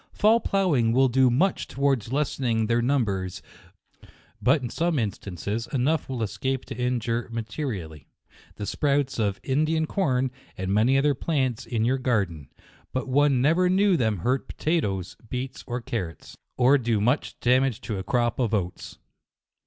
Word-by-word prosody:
Fall 220 +2 +4
plough 195 -6 +1
ing 115 -4 +2
will 130 +1 +4
do 130 +1 +4
much 170 +11 +1
towards 135 -5 0
lessening 130 -5 0
their 115 +2 +1
num 130 0 +2
bers 95 -3 -4 0.6
5 - - -18 0.3
but 135 +2 +3
h 120 - -4
some 170 -1 0
instances, 105 - -3
enough 140 +4 0
will 125 -4 -2
es 105 -2 -5
cape 130 +2 -1
to - - -7
injure 120 -1 -1
materially, 105 - -5 0.5
the 105 - -5
sprouts 140 0 0
of 100 -3 0
In 140 +3 +1
dian 160 0 +1
corn 135 -9 0 0.3
and 95 +1 -2
many 115 +6 +4
other 145 +1 +3
plants 130 -5 -1
in 115 -2 0
your 130 +2 +1
gar 120 -6 +2
den; 80 -6 -11 0.4
but 130 +1 -3
1 135 -1 +3
never 170 +5 +3
knew 195 +1 +4
them 110 -8 +1
hurt 125 +9 -1
potatoes, 100 - -2
beets 130 +1 -5
or 120 0 -2
carrots, 90 - -5 0.2
or 130 +3 +5
do 115 -3 0
much 125 +8 0
damage 125 -1 +2
to 105 -4 -4
a - - -4
crop 120 +3 0
of 115 -3 +1
oats. 90 -3 -4
125 Hz, 170 wpm, -25 LUFS, 110-140 Hz, 0.6 s, or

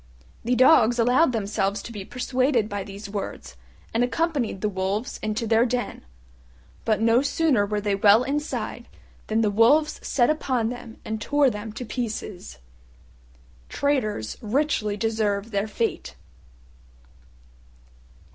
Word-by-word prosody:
The 245 +2 +1
Dogs 245 -2 +5
allowed 250 +6 +4
themselves 200 -2 -1
to - - -8
be 205 -4 -6
persuaded 255 0 0
by 205 -2 -4
these 200 +2 -9
words, 200 - -6 0.4
and 230 +2 +2
accompanied 265 - -1
the 210 - +1
Wolves 195 +3 -3
into 215 +2 -2
their 225 +1 +4
den. 245 0 -2 0.8
But 215 -1 +1
no 230 +2 +4
sooner 280 -7 +1
were 210 0 -1
they 205 0 0
well 205 +3 +5
inside 295 +3 -3 0.4
than 220 +1 +1
the 210 -2 +2
Wolves 285 +9 +3
set 245 +1 +2
upon 255 -7 -1
them 245 -2 -8
and 220 0 -4
tore 290 +2 +3
them 210 +1 -6
to 250 - -6
pieces. 215 - -5 1.1
Traitors 250 - -1
richly 220 -3 0
deserve 220 -1 -1
their 200 0 -1
fate. 225 +1 -3
225 Hz, 130 wpm, -24 LUFS, 210-250 Hz, 1.1 s, Dogs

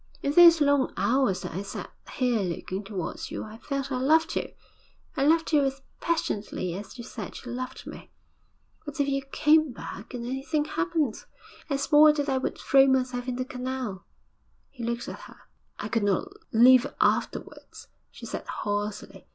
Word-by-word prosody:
'In 280 - +1
those 335 -1 +8
long 285 -2 +3
hours 235 -7 +2
that - - -5
I 185 - -3
sat 200 - -7 0.2
here 250 -3 +1
looking 185 +1 -3
towards 195 -5 -5
you, - - -5
I 220 +1 -10
felt 275 0 -4
I 255 - -1
loved 320 +5 +3
you - - -2 0.6
I 270 - 0
loved 320 +2 +3
you 290 -2 +5
as 270 0 -2 0.2
passionately 210 - -2
as 200 +7 -8
you 240 - -7
said 220 -4 -7
you 245 - -6
loved 255 +1 -6
me. - - -10 0.7
But 295 -2 -8
if 285 - +2
you 275 0 0
came 300 +2 +3
back, 235 0 -8
and 235 -1 -5
anything 270 +4 -1
happened 325 -8 -1 0.5
I 280 - +1
swore 300 +2 +6
that 290 -1 -2
I 265 -1 +1
would - - -3
throw 270 0 +5
myself 255 -1 0
in 250 - -2
the 255 +1 -3
canal.' 255 -6 -5 0.7
He 245 -4 -9
looked 235 +1 -3
at - - -7
her. - - -13 0.4
'I 210 - -5
could 225 -2 0
not 205 - +1 0.2
live 255 +3 +6
afterwards,' - - -1 0.2
she - - -11
said - - -6
hoarsely. 205 0 -4
260 Hz, 175 wpm, -27 LUFS, 230-285 Hz, 0.7 s, those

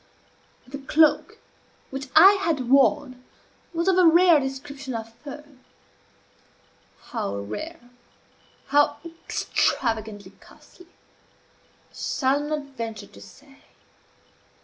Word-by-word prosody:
The 275 +2 -8
cloak 300 +2 +2 0.5
which 270 +1 -6
I 365 +5 +9
had 275 -8 -1
worn 255 -1 +2 0.5
was 335 +1 -2
of 375 -1 +3
a 360 - +6
rare 340 -1 +6
description 270 -1 -6
of 225 0 -7
fur; 295 +3 -11 1.6
how 100 - -5
rare, 245 - -8 0.8
how 290 +1 +3
extravagantly 220 - -2
costly, 360 - -19
I - - -35
shall 270 +1 0
not 295 -2 -5
venture 225 -3 -6
to 100 - -17
say. 270 - -17
275 Hz, 100 wpm, -24 LUFS, 240-310 Hz, 1.6 s, I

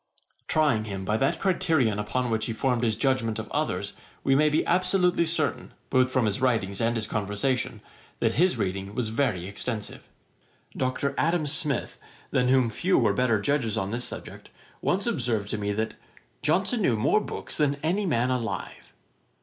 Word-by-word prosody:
Trying 145 -9 +2
him 95 -2 -5
by 105 - +1
that 140 +7 +1
criterion 160 - +2
upon 120 +4 -1
which 110 0 0
he 115 - -2
formed 125 +1 0
his 110 -2 +2
judgement 115 -2 0
of 110 0 -5
others, - - -1 0.3
we 135 - +3
may 150 +3 +4
be 150 - +1
absolutely 180 -1 +3
certain, 155 -5 -1 0.2
both 130 0 +4
from 130 -2 +1
his 105 +4 -1
writings 110 -6 +1
and 115 +1 +1
his 110 -2 -1
conversation, 105 +5 -1 0.4
that - - +2
his 175 -3 +2
reading 100 -1 -3
was 120 -3 -1
very 110 -7 0
extensive. 105 +3 -5 0.7
Dr. 130 +2 -1
Adam 165 0 +2
Smith, 145 -2 0 0.3
than 125 0 +2
whom 130 -3 +3
few 180 - +1
were 110 -5 +3
better 115 -1 +2
judges 115 -2 0
on 95 -1 -2
this 120 +2 -2
subject, - - -7 0.3
once 195 +2 0
observed 120 - -1
to 110 - -2
me 105 0 -1
that 110 +1 -2 0.5
'Johnson 195 +9 +1
knew 125 - +2
more 145 - +3
books - - -6
than 145 -2 +2
any 190 +5 +1
man 125 -4 +1
alive.' 115 -7 -4
125 Hz, 175 wpm, -26 LUFS, 110-150 Hz, 0.7 s, may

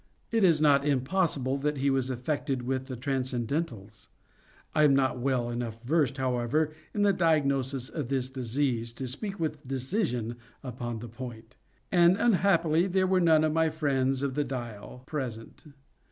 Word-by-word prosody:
It 225 -2 +2
is 165 -5 +5
not 145 -2 +4
impossible 140 -1 +1
that 150 +1 -1
he 140 +1 +1
was 135 -1 0
affected 130 0 -2
with 130 +1 -2
the 130 -2 -6
transcendentals. 125 - -3 0.7
I 155 - +3
am 145 -2 +6
not 130 -2 +1
well 125 -2 0
enough 115 -1 -5
versed, 145 0 +1
however, 130 +4 0 0.2
in 205 - 0
the 200 -1 +4
diagnosis 140 -6 +1
of 150 -6 -4
this 130 -1 -1
disease 125 -2 -2
to 130 - -5
speak 195 - -4
with 155 -3 -3
decision 130 - -1 0.3
upon 120 -2 -5
the 120 - -6
point; 115 0 -9 0.4
and 175 +1 +5
unhappily 185 -6 +3
there 190 0 +2
were 185 0 +2
none 160 -2 +5
of 155 -1 +1
my 160 0 +3
friends 135 -4 0
of 140 -2 -1
the 145 - 0
"Dial" 120 -2 -7
present. 125 -6 -6
135 Hz, 160 wpm, -28 LUFS, 125-155 Hz, 0.7 s, am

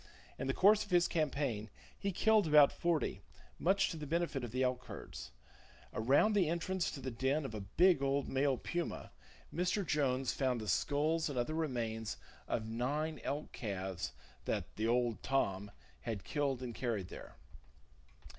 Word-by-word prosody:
In - - -2
the 135 - +1
course 210 +2 +6
of - - -13
his 175 -1 +4
campaign 140 -9 -1 0.3
he 200 - -2
killed 215 +1 +4
about 150 -2 +7
forty, 170 -3 0 0.4
much 195 +2 +3
to 165 - -5
the 150 -1 -6
benefit 165 -4 -1
of 120 - -3
the 130 +4 0
elk 125 0 0
herds. 65 - -8 0.6
Around 140 - +4
the 190 -6 +3
entrance 170 +2 -1
to 145 - -6
the 130 -1 -4
den 135 +5 0
of 110 - -5
a 105 - -4
big 175 - +4
old 140 0 +1
male 135 0 +1
puma, 175 +6 -4 0.4
Mr. 180 +3 0
Jones 135 -5 +1
found 130 -3 0
the 110 - -6
skulls 155 - +1
and 140 - -4
other 120 +6 0
remains 115 -8 -2 0.3
of 110 - -1
nine 140 +7 -2
elk 145 +2 -3
calves 95 - -4 0.3
that - - -2
"the 110 +1 0
old 120 -1 +1
Tom" 105 -7 0 0.3
had 110 -5 -4
killed 135 -3 -1
and 120 -2 -4
carried 110 -7 -2
there. - - -10
135 Hz, 165 wpm, -35 LUFS, 120-160 Hz, 0.6 s, about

